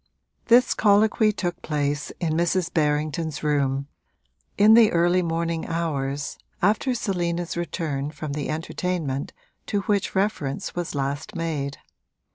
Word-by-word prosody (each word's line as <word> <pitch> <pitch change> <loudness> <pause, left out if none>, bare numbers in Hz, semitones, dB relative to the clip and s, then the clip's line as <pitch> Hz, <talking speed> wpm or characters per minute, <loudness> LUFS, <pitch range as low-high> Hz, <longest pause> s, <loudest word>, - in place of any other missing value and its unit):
This 245 +2 +5
colloquy 215 +1 +4
took 175 -4 -3
place 145 -1 -1
in 165 -3 0
Mrs. 170 +2 0
Berrington's 155 0 0
room, 140 -2 +1 0.7
in 210 +2 +7
the 225 -2 +7
early 175 +2 +3
morning 165 -1 -2
hours, 145 -4 -2 0.2
after 220 +7 +2
Selina's 175 -5 -2
return 155 -5 -2
from 150 -1 -6
the 145 -1 -3
entertainment 160 -3 -2 0.4
to 205 - 0
which 200 -1 0
reference 190 -4 -1
was 175 -3 -4
last 145 +8 -3
made. 150 -4 -2
165 Hz, 120 wpm, -24 LUFS, 145-185 Hz, 0.7 s, in